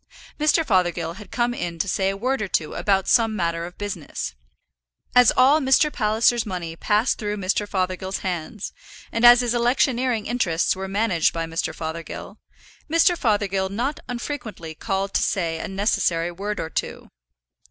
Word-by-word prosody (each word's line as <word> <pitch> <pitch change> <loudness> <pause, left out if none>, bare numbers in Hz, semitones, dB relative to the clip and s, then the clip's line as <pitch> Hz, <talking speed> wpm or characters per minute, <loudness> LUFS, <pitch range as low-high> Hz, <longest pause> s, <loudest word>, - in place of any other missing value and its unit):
Mr. 310 +2 +3
Fothergill 175 - 0
had 205 -3 -11
come 240 0 0
in 175 -7 -4
to 165 - -1
say 190 +1 +1
a 195 - -3
word 255 +4 -1
or 210 - -1
two 160 -4 -1
about 195 -2 +1
some 225 -2 +3
matter 170 -2 -1
of 180 - -13
business. 185 - -5 0.8
As 250 -2 +7
all 270 +4 +6
Mr. 280 +2 +3
Palliser's 225 +1 +2
money 175 -5 -5
passed 210 +7 +1
through 210 -1 -3
Mr. 200 +2 -1
Fothergill's 185 0 -2
hands, 180 +2 -4 0.4
and 230 - -2
as 240 0 +9
his 240 -1 0
electioneering 245 -1 +1
interests 185 -10 +1
were 190 0 -5
managed 195 -4 +1
by 165 0 -2
Mr. 165 0 -2
Fothergill, 165 +1 -7 0.5
Mr. 335 +2 +4
Fothergill 200 - 0
not 245 +9 -2
unfrequently 240 - -5
called 195 +3 -3
to - - +2
say 165 -4 -1
a - - -4
necessary 180 -4 0
word 205 +4 -4
or 160 - -4
two. - - -4
200 Hz, 165 wpm, -23 LUFS, 175-240 Hz, 0.8 s, as